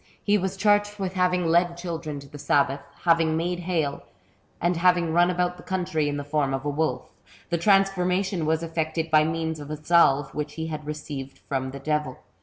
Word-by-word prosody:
He 205 Hz, -, +3 dB
was 190 Hz, -1 st, -1 dB
charged 205 Hz, +1 st, +2 dB
with 190 Hz, -2 st, -3 dB
having 180 Hz, -1 st, +1 dB
led 170 Hz, +1 st, +2 dB
children 165 Hz, -4 st, -5 dB
to 140 Hz, -, -13 dB
the 145 Hz, +1 st, -11 dB
sabbath, 140 Hz, 0 st, +2 dB, 0.2 s
having 165 Hz, -2 st, +3 dB
made 175 Hz, +2 st, -1 dB
hail, 165 Hz, -5 st, -1 dB, 0.6 s
and 175 Hz, +1 st, +1 dB
having 175 Hz, -1 st, +3 dB
run 175 Hz, +1 st, +4 dB
about 180 Hz, 0 st, 0 dB
the -, -, -12 dB
country 175 Hz, -5 st, -1 dB
in 145 Hz, -, -2 dB
the 145 Hz, -, -4 dB
form 145 Hz, -2 st, 0 dB
of 135 Hz, +1 st, -6 dB
a -, -, 0 dB
wolf. 155 Hz, +2 st, -2 dB, 0.4 s
The 170 Hz, -, +1 dB
transformation 190 Hz, -2 st, +2 dB
was 160 Hz, +1 st, +1 dB
effected 160 Hz, 0 st, -2 dB
by 155 Hz, 0 st, +5 dB
means 160 Hz, 0 st, -2 dB
of 145 Hz, 0 st, -8 dB
a 155 Hz, -, -4 dB
salve 145 Hz, -3 st, +3 dB
which 150 Hz, 0 st, -4 dB
he 160 Hz, 0 st, -3 dB
had 155 Hz, -2 st, -6 dB
received 145 Hz, -3 st, -6 dB
from 130 Hz, -1 st, -2 dB
the 135 Hz, -, -7 dB
devil. 150 Hz, -2 st, -2 dB
165 Hz, 200 wpm, -25 LUFS, 150-180 Hz, 0.6 s, by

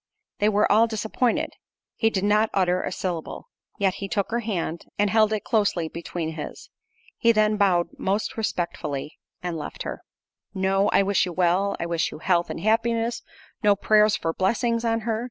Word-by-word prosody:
They 210 Hz, -, +3 dB
were 210 Hz, 0 st, +2 dB
all 220 Hz, +3 st, +5 dB
disappointed—he 225 Hz, 0 st, -2 dB
did 195 Hz, -3 st, -2 dB
not 210 Hz, +2 st, +3 dB
utter 180 Hz, -1 st, +2 dB
a -, -, -3 dB
syllable. 175 Hz, -, -4 dB, 0.3 s
Yet 195 Hz, -2 st, +2 dB
he 200 Hz, -, -2 dB
took 200 Hz, +1 st, -1 dB
her 235 Hz, -, +1 dB
hand, 175 Hz, -7 st, -3 dB
and 205 Hz, -1 st, +2 dB
held 220 Hz, -1 st, +4 dB
it 215 Hz, -1 st, -1 dB
closely 205 Hz, -8 st, +1 dB
between 170 Hz, -1 st, -4 dB
his. 155 Hz, -2 st, -8 dB, 0.5 s
He 230 Hz, -, +5 dB
then 215 Hz, -1 st, +3 dB
bowed 185 Hz, -4 st, +2 dB
most 200 Hz, +3 st, -1 dB
respectfully 170 Hz, -9 st, -3 dB, 0.2 s
and 175 Hz, -2 st, -2 dB
left -, -, -6 dB
her. -, -, -6 dB, 0.5 s
No 195 Hz, +1 st, +2 dB
"I -, -, +4 dB
wish 195 Hz, -1 st, +2 dB
you 180 Hz, -, -5 dB
well;—I 185 Hz, +1 st, +1 dB
wish 170 Hz, -1 st, 0 dB
you -, -, -8 dB
health 175 Hz, +2 st, +1 dB
and -, -, -5 dB
happiness." 230 Hz, +2 st, +1 dB, 0.4 s
No 205 Hz, -2 st, +4 dB
"Prayers 210 Hz, +1 st, +4 dB
for 165 Hz, -, -2 dB
blessings 230 Hz, +5 st, 0 dB
on 225 Hz, -1 st, +1 dB
her." 220 Hz, 0 st, -1 dB
200 Hz, 170 wpm, -24 LUFS, 175-220 Hz, 0.5 s, all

